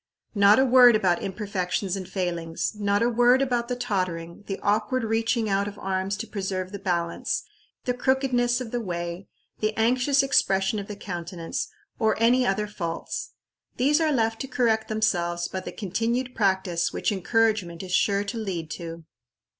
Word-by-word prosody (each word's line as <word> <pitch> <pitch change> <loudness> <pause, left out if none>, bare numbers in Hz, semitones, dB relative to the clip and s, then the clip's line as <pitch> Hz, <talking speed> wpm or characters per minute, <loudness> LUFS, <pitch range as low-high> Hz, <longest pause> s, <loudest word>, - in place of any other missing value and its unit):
Not 200 0 +6
a 265 - +5
word 250 -2 +7
about 185 -5 +2
imperfections 195 -1 -2
and 190 -2 -6
failings, 170 -4 -2
not 205 0 +1
a - - +3
word 245 +2 +4
about 245 -3 0
the 250 - -2
tottering, 185 -6 -3
the 195 - -4
awkward 220 +5 +1
reaching 225 +1 0
out 200 0 +1
of 205 0 -7
arms 190 +1 -2
to 225 +2 -5
preserve 190 -3 -3
the 200 - -6
balance, 170 -3 -1 0.4
the 250 - +1
crookedness 245 -1 +1
of 245 -3 -6
the 245 - -1
way, 175 -1 -4 0.3
the 215 0 -1
anxious 255 +5 +3
expression 195 -6 +2
of 200 - -6
the 210 - -6
countenance, 175 -3 -5 0.3
or 220 -2 +2
any 245 +2 +4
other 205 +2 +1
faults. 170 -5 -5 0.4
These 290 +6 +3
are 315 -1 +2
left 225 -4 0
to 270 - -4
correct 230 -4 +1
themselves 175 -6 0
by 190 - -4
the 185 - -7
continued 230 +6 -2
practice 190 -4 +1
which - - -1
encouragement 200 -3 0
is 185 - -7
sure 200 +1 +2
to 205 +3 -5
lead 175 -7 -4
to. 165 -1 -7
205 Hz, 170 wpm, -25 LUFS, 185-235 Hz, 0.4 s, word